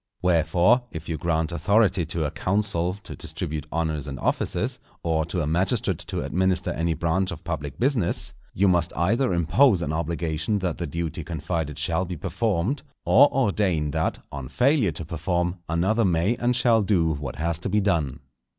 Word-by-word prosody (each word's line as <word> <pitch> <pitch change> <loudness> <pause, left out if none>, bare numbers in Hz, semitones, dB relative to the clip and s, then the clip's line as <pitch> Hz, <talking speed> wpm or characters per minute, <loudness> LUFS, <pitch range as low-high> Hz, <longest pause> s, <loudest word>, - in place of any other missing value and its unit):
Wherefore, 90 +7 +3
if 80 -3 -8
you 80 -3 -3
grant 80 0 0
authority 95 -1 +2
to 80 -2 -1
a 75 - -2
council 90 -1 0
to - - -7
distribute 80 -2 -5
honours 80 -3 -1
and 70 -1 -6
offices, - - -1 0.2
or 80 -1 +1
to 85 +1 -2
a - - 0
magistrate 85 +5 +1
to - - -4
administer 95 0 0
any 85 0 -1
branch 90 +4 0
of 80 - -7
public 75 -4 -4
business, 125 -8 +1 0.2
you 100 +2 +3
must 85 -2 +2
either 115 +9 +2
impose 90 - +4
an 75 - -2
obligation 80 +3 -1
that 90 -5 -2
the 85 - -2
duty 80 +1 -4
confided 80 -2 -3
shall 80 +4 0
be 90 -1 -5
performed, 110 - -1 0.2
or 140 +6 +6
ordain 95 - +1
that, - - -1
on 70 -2 -6
failure 125 - +2
to 80 +1 -6
perform, 85 +2 -1
another 95 +8 +2
may 90 +4 +2
and 120 +1 +1
shall 120 -3 +4
do 90 -6 +2
what 70 -1 -5
has 85 0 -1
to 90 - -3
be 105 +2 +2
done. 85 -10 0
85 Hz, 175 wpm, -25 LUFS, 80-100 Hz, 0.2 s, or